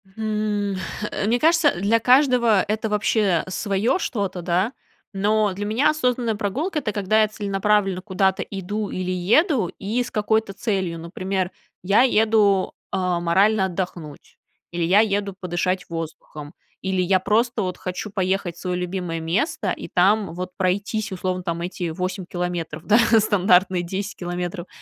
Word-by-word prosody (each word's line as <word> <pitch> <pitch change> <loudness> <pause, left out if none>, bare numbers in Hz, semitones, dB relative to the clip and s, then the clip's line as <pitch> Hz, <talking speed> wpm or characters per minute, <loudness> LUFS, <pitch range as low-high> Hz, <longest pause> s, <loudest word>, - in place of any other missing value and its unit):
Хм, 210 -2 -1 0.4
э, - - -2
мне 240 +2 +2
кажется, 330 -2 +4
для 220 +4 +2
каждого 250 -5 +4
это 215 +1 -1
вообще 210 -4 +1
свое 200 - 0
что-то, 200 - -3
да. 185 +8 0 0.4
Но 210 0 +1
для 205 +2 -4
меня 240 +8 +2
осознанная 250 -6 0
прогулка- 280 - -2
это 220 -6 -2
когда 210 +2 +2
я 215 - +4
целенаправленно 200 -2 0
куда-то 190 -1 0
иду 205 +2 -4
или 185 0 -3
еду 220 - +2
и 225 +5 -1
с - - -9
какой-то 215 -1 0
целью. 190 -5 -2
Например, 185 +2 -3 0.3
я 205 +6 +4
еду, 215 -5 +3 0.2
а, 180 -2 0
морально 190 +4 +3
отдохнуть, 175 -5 -6 0.3
или 170 -1 -2
я 190 +5 +4
еду 200 -2 +1
подышать 180 +1 -2
воздухом, 155 -2 -7 0.3
или 190 -1 0
я 185 +1 +3
просто 225 +2 +1
вот 180 -1 -3
хочу 185 +3 -5
поехать 190 -2 -1
в - - -15
свое 180 -1 -2
любимое 180 -2 -3
место 265 - -1
и - - -5
там 195 +1 +2
вот 180 +1 -5
пройтись- 200 +3 -1
условно 185 0 -2
там 170 0 -3
эти 175 -1 -3
8 185 +2 -4
километров, 175 -3 -4
да, 215 +3 +5 0.2
стандартные 185 -3 +3
10 195 +3 -4
километров. 175 0 -4
195 Hz, 150 wpm, -22 LUFS, 180-215 Hz, 0.4 s, да